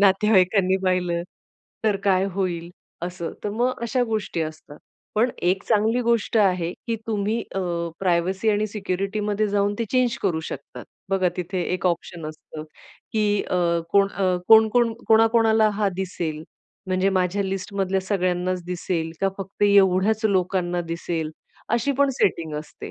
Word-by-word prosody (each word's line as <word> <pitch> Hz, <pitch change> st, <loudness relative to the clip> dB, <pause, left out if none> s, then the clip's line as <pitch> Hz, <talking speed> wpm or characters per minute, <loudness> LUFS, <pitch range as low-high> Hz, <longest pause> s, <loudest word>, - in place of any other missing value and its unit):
नातेवाईकांनी 190 Hz, -1 st, +4 dB
पाहिलं, 180 Hz, -2 st, +1 dB, 0.6 s
तर 210 Hz, -2 st, +3 dB
काय 190 Hz, -1 st, +3 dB
होईल?" 175 Hz, -3 st, -2 dB, 0.4 s
असं. 175 Hz, -2 st, -5 dB
तर 210 Hz, -, -1 dB
मग 245 Hz, +4 st, -1 dB
अशा 245 Hz, +2 st, +1 dB
गोष्टी 215 Hz, -7 st, -2 dB
असतात. 155 Hz, -1 st, -8 dB, 0.4 s
पण 235 Hz, +4 st, +3 dB
एक 185 Hz, +2 st, +1 dB
चांगली 225 Hz, +2 st, +2 dB
गोष्ट 235 Hz, -1 st, +1 dB
आहे 180 Hz, -5 st, +2 dB
की 230 Hz, -1 st, -1 dB
तुम्ही 215 Hz, +1 st, -1 dB
अ, 195 Hz, -, 0 dB, 0.4 s
प्रायव्हसी 185 Hz, +3 st, +1 dB
आणि 210 Hz, 0 st, +1 dB
सिक्युरिटी 195 Hz, 0 st, -3 dB
मध्ये 210 Hz, +1 st, 0 dB
जाऊन 205 Hz, 0 st, +1 dB
ते 230 Hz, -, 0 dB
चेंज 255 Hz, -2 st, +2 dB
करू 175 Hz, -5 st, +1 dB
शकतात. 140 Hz, -, -8 dB, 0.2 s
बघा 190 Hz, -2 st, +2 dB
तिथे 180 Hz, +1 st, -2 dB
एक 185 Hz, -, -2 dB
ऑप्शन 170 Hz, -2 st, -2 dB
असतं, 155 Hz, 0 st, -9 dB, 0.5 s
की 215 Hz, -1 st, +1 dB, 0.2 s
अ, 180 Hz, -, -2 dB, 0.4 s
कोण 200 Hz, 0 st, +5 dB
अ, 190 Hz, -2 st, 0 dB
कोण 220 Hz, 0 st, +8 dB
कोण 235 Hz, 0 st, +2 dB, 0.2 s
कोणा 225 Hz, 0 st, +6 dB
कोणाला 220 Hz, -1 st, +4 dB
हा 205 Hz, -, +3 dB
दिसेल? 170 Hz, -5 st, -3 dB, 0.4 s
म्हणजे 185 Hz, +1 st, +1 dB
माझ्या 185 Hz, +2 st, +1 dB
लिस्ट 195 Hz, +1 st, -4 dB
मधल्या 195 Hz, -1 st, 0 dB
सगळ्यांनाच 185 Hz, -2 st, -1 dB
दिसेल, 175 Hz, -2 st, -2 dB
का 195 Hz, -, +3 dB
फक्त 195 Hz, +1 st, -6 dB
एवढ्याच 200 Hz, +2 st, +4 dB
लोकांना 185 Hz, -3 st, +1 dB
दिसेल 165 Hz, -1 st, -3 dB, 0.4 s
अशी 240 Hz, +4 st, +2 dB
पण 280 Hz, 0 st, +4 dB
सेटिंग 165 Hz, -9 st, 0 dB
असते. 150 Hz, 0 st, -7 dB
195 Hz, 150 wpm, -23 LUFS, 180-215 Hz, 0.6 s, कोण